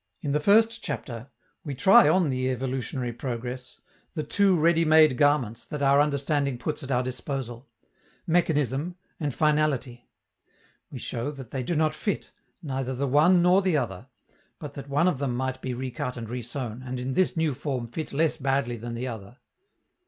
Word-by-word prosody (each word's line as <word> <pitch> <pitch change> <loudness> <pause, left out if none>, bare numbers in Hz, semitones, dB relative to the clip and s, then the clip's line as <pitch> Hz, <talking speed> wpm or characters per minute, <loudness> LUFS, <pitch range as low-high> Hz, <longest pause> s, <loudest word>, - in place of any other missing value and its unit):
In 145 - -2
the 150 - +2
first 225 +6 +3
chapter, 120 0 -5 0.3
we 145 -3 -5
try 195 - +6
on 180 -6 +3
the 130 0 -1
evolutionary 130 -1 -3
progress 125 +1 -6 0.4
the 155 - -2
two 195 +5 +3
ready 165 +1 +3
made 155 -3 +6
garments 130 -5 +2
that 150 -1 -4
our 140 +1 +5
understanding 140 -2 0
puts 150 +5 -4
at 135 - -8
our 125 -1 +1
disposal, 130 -1 -5 0.6
mechanism 160 - +1 0.2
and 150 -3 -1
finality; 140 -5 0 0.8
we - - -8
show 120 +4 -4
that 135 -5 -9
they 135 - -2
do 165 +7 -2
not 155 0 +2
fit, 205 - -3 0.3
neither 130 -3 -3
the 140 +2 -1
one 165 +6 +5
nor 180 +2 +5
the 185 -5 +2
other, 115 -3 -4 0.5
but 150 - -8
that 140 0 -9
one 145 +6 +2
of 150 -8 +1
them 135 -4 -1
might 130 +1 -3
be 130 -1 -3
recut 125 +1 -4
and 115 -2 -6
resewn, 120 -1 -5
and 130 0 -5
in 130 +1 -3
this 185 +3 +1
new 160 -3 +1
form 130 -2 -3
fit 155 +7 -6
less 155 +3 +1
badly 135 -3 0
than 115 +1 -6
the 125 +2 -3
other. 115 0 -8
135 Hz, 175 wpm, -26 LUFS, 125-155 Hz, 0.8 s, try